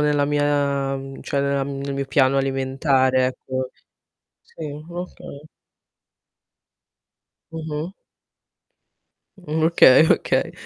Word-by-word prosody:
nella 150 -1 +2
mia, 145 -1 0
mhmm, 135 0 -9
cioè 140 - -2
nella 140 0 0
nel 140 0 -4
mio 140 0 -3
piano 135 0 +3
alimentare, 135 -1 +1
ecco. 130 0 -4 0.7
Sì, - - -15 0.3
okay. 170 -4 -9 2.0
Mh-mh. 160 +1 -5 1.5
Mh, 160 -3 -3
okay, 160 -3 +6
okay. - - +1
140 Hz, 90 wpm, -22 LUFS, 135-150 Hz, 2.0 s, okay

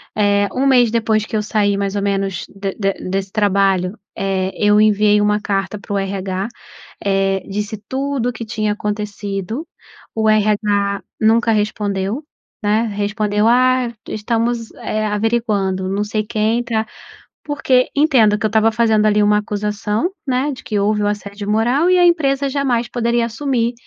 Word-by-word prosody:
Eh, 205 -1 +2
um 270 +2 +1
mês 245 -4 +4
depois 220 -2 +1
que 225 - -5
eu 215 - +1
saí 205 -1 +1
mais 200 0 -2
ou 200 - -1
menos 195 -2 -1
de 195 0 -5
de 195 -2 0
de - - -8
desse 195 0 -2
trabalho, 195 -1 +1 0.2
eh, 190 -1 -1
eu 210 0 +3
enviei 210 0 +4
uma 210 0 +2
carta 195 0 -2
para 205 - -11
o - - +1
RH, 195 0 -2 0.6
eh, 195 -1 +1
disse 210 +2 -3
tudo 265 -2 -1
que 230 -1 -7
tinha 215 -1 -1
acontecido, 210 - -4 0.5
o 220 -1 +2
RH 205 -2 +1 0.2
nunca 225 +1 +3
respondeu, 210 +3 -1 0.4
né, 210 +2 +2
respondeu: 210 0 0
"Ah, 255 0 +3 0.2
estamos, 230 +1 -1
eh, 215 0 -2
averiguando, 205 -3 0
não 200 +2 -1
sei 215 0 -2
quem 220 +3 0
tá", 225 -2 -1 0.6
porque 265 -4 +1
entendo 250 -9 +4
que 220 - -2
eu - - +2
estava 220 +1 +3
fazendo 220 -2 +2
ali 210 0 +3
uma 210 0 +4
acusação, 210 - -2 0.2
né, 260 +3 0
de 260 - -9
que 210 - -2
houve 210 +1 +1
o 205 - +1
assédio 205 0 -4
moral 245 +10 +2
e 365 - +4
a 355 - +6
empresa 280 -5 +2
jamais 255 -4 0
poderia 235 -1 0
assumir 235 0 -1
215 Hz, 165 wpm, -18 LUFS, 200-235 Hz, 0.6 s, a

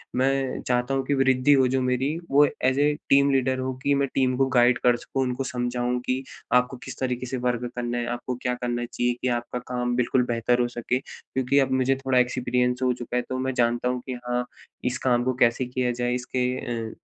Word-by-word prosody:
मैं 135 0 0
चाहता 125 +2 +1
हूँ 135 0 0
कि 145 - 0
वृद्धि 135 +1 +4
हो 130 -2 +4
जो 130 +1 0
मेरी, 130 +5 0
वो 145 +1 +6 0.2
एज़ 130 +2 +2
ए 150 +1 +3 0.2
टीम 140 0 +5
लीडर 130 -1 +1
हो 130 0 -2
कि 140 - +3
मैं 140 0 +1
टीम 130 -1 +2
को 135 - +3
गाइड 120 +1 +5
कर 120 -1 +5
सकूँ 135 +2 -2
उनको 125 +1 -2
समझाऊँ 125 0 -1
कि 130 +1 -1 0.3
आपको 125 +1 +3
किस - - -8
तरीके 125 -1 -2
से 130 +1 -3
वर्क 120 0 -1
करना 120 0 -2
है? 120 - -1
आपको 120 +1 -3
क्या 125 -1 0
करना 120 0 -1
चाहिए 120 0 -1
कि 130 - 0
आपका 125 +1 -6
काम 125 0 0
बिल्कुल 125 +1 +2
बेहतर 120 +1 +1
हो 120 - +1
सके, 120 +1 -2
क्योंकि 130 0 -1
अब 135 -1 +1
मुझे 135 +1 +2
थोड़ा 130 -1 +3
एक्सपीरियंस 125 0 +1
हो 125 -1 +3
चुका 120 0 -6
है - - +2
तो 130 - -2
मैं 130 0 -1
जानता 120 0 +1
हूँ 125 -1 -2
कि 130 - -4
हाँ, 125 0 0 0.4
इस 125 +1 -1
काम 120 -1 +3
को 130 0 0
कैसे 120 +2 +2
किया 125 0 -1
जाए 120 0 -1
इसके 125 0 -1 0.4
अ, - - -10
125 Hz, 225 wpm, -25 LUFS, 125-130 Hz, 0.4 s, वो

